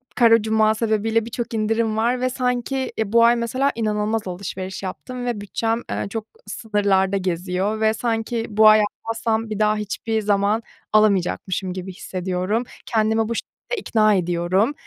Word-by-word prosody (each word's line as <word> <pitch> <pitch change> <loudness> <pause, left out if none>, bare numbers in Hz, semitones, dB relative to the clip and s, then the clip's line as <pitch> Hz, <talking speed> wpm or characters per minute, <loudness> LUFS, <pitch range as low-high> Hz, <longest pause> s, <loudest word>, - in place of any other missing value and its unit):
Kara 230 -2 +5
Cuma 220 0 +2
sebebiyle 220 0 0
birçok 235 0 -5
indirim 220 0 0
var 245 +3 +1
ve 255 - +1
sanki, 255 +1 -2
eee, 220 -2 -1
bu 230 0 +6
ay 240 +1 +5
mesela 255 +4 0
inanılmaz 215 -1 -1
alışveriş 185 +1 -5
yaptım 245 +6 -6
ve 235 -4 -2
bütçem, 225 +3 -1
eee, - - -2
çok 220 0 -4 0.2
sınırlarda 200 -3 +1
geziyor 185 +3 -1
ve 220 0 +3
sanki 225 0 -2
bu 215 +1 +5
ay 215 0 +7
almazsam 225 +1 -2
bir 215 -1 -4
daha 215 0 +3
hiçbir 220 +1 -2
zaman 205 +2 +1 0.3
alamayacakmışım 190 -2 +1
gibi 185 0 -6
hissediyorum. 185 +5 -2 0.2
Kendimi 220 0 +1
bu 230 - -1
şekilde - - -6
ikna 215 -2 +3
ediyorum. 180 +7 +1
220 Hz, 155 wpm, -22 LUFS, 200-230 Hz, 0.3 s, ay